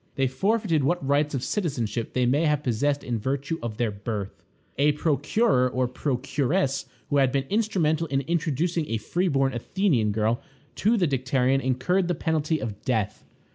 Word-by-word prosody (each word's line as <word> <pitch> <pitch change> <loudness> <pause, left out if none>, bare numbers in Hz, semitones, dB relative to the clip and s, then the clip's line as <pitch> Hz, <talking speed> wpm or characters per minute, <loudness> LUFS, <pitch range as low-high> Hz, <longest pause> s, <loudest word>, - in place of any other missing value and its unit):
They 135 - +2
forfeited 170 - +1
what 140 -1 0
rights 145 +1 +2
of 130 - -2
citizenship 120 - -2
they 125 -1 +2
may 140 +7 +2
have 150 -1 +1
possessed 140 +4 0
in 120 -2 -2
virtue 140 +7 -2
of 115 -2 -5
their 115 -3 0
birth. 100 -1 -5 0.4
A 145 +1 +4
procurer 150 - +2
or 130 0 0
procuress 135 +3 -1 0.2
who 145 - +3
had 135 -2 +4
been 135 0 0
instrumental 175 -7 +1
in 135 -2 0
introducing 165 +1 -1
a 115 - 0
free 175 - -1
born 135 -4 +1
Athenian 120 - +1
girl 110 +3 0 0.4
to 225 +4 +3
the 185 - +3
Dicterion 130 0 +1
incurred 135 +9 +1
the 175 - 0
penalty 160 0 0
of 105 -2 -5
death. 110 -4 -2
140 Hz, 170 wpm, -25 LUFS, 125-165 Hz, 0.4 s, A